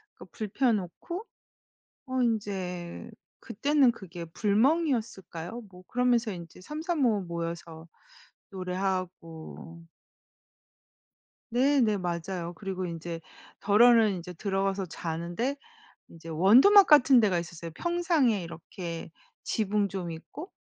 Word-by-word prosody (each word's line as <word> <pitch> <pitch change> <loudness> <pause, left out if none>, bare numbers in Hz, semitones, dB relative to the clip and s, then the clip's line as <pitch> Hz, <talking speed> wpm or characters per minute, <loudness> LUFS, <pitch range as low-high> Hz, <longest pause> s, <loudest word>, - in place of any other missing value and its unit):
그 - - -12
불 215 - -5
피워 250 +1 +2
놓고, 215 - -5 0.8
어 260 0 -1
인제 190 -6 -3 0.3
그때는 285 -3 +2
그게 180 -6 -9
불멍이었을까요? 220 - 0
뭐 180 -1 -14
그러면서 245 -2 +2
인제 170 -1 -10
삼삼오오 300 - 0
모여서 170 -1 -6 0.6
노래하고... 180 -3 -5 1.7
네 270 +3 +3
네. 215 -3 +3
맞아요. 175 -1 -3
그리고 190 -2 -4
인제 165 0 -6 0.4
더러는 220 +1 +5
인제 180 0 -7
들어가서 195 +1 -1
자는데 170 - -3 0.5
인제 165 0 -12
원두막 250 - +7
같은 275 -4 +7
데가 200 -6 +3
있었어요. 170 0 -6
평상에 335 - +1
이렇게 170 0 -7 0.3
지붕 210 -1 0
좀 185 -2 -5
있고? 295 - -9
195 Hz, 245 characters per minute, -28 LUFS, 170-245 Hz, 1.7 s, 원두막